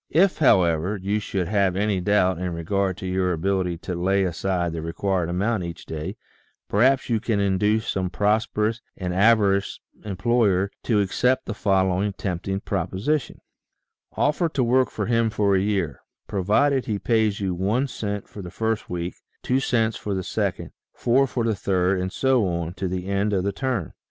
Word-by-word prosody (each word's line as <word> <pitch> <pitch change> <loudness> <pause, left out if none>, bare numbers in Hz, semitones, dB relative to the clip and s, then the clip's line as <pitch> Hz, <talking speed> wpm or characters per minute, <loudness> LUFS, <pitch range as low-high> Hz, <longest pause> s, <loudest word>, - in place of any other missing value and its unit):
If, 185 +5 +3
however, 90 - +3
you 100 +3 -1
should 95 -3 -2
have 100 -2 +1
any 100 -1 0
doubt 95 -2 +2
in 90 -2 -3
regard 95 +2 -1
to 100 - -7
your 90 0 0
ability 90 0 -1
to 90 - -2
lay 95 +3 +1
aside 90 -1 -1
the 80 - -4
required 85 +1 -1
amount 100 +3 0
each 85 -1 -7
day, 80 +6 -5 0.5
perhaps 130 +6 +3
you 115 -2 +1
can 110 -1 -1
induce 105 +3 +1
some 95 -1 -1
prosperous 105 +3 0 0.2
and 90 -2 -3
avaricious 100 -1 +3 0.2
employer 100 -1 +1
to 110 -4 +3
accept 125 +6 +1
the 115 - -3
following 95 -1 +1
tempting 95 +1 -3
proposition: 105 +9 -2 0.8
Offer 150 +3 +2
to 135 -4 0
work 130 +2 +3
for 105 - -3
him 115 0 +2
for 100 -2 +2
a - - +3
year, 95 -8 -1 0.3
provided 125 +8 +1
he 105 -3 0
pays 110 -1 +1
you 95 -2 -1
one 105 +10 0
cent 105 -5 -4
for 105 - -9
the 90 - -7
first 110 +4 -2
week, 90 0 -3 0.3
two 130 +1 +1
cents 115 -5 +1
for 100 -2 -3
the 95 - -2
second, - - -2 0.2
four 130 +3 +3
for 120 0 -2
the 115 -1 +1
third, 95 -1 +1
and 95 0 -3
so 130 -5 +2
on 85 -1 -2
to 95 0 -3
the 90 0 -3
end 100 +2 0
of 95 -2 +1
the 100 0 -1
term. 125 - -2
100 Hz, 175 wpm, -24 LUFS, 90-110 Hz, 0.8 s, If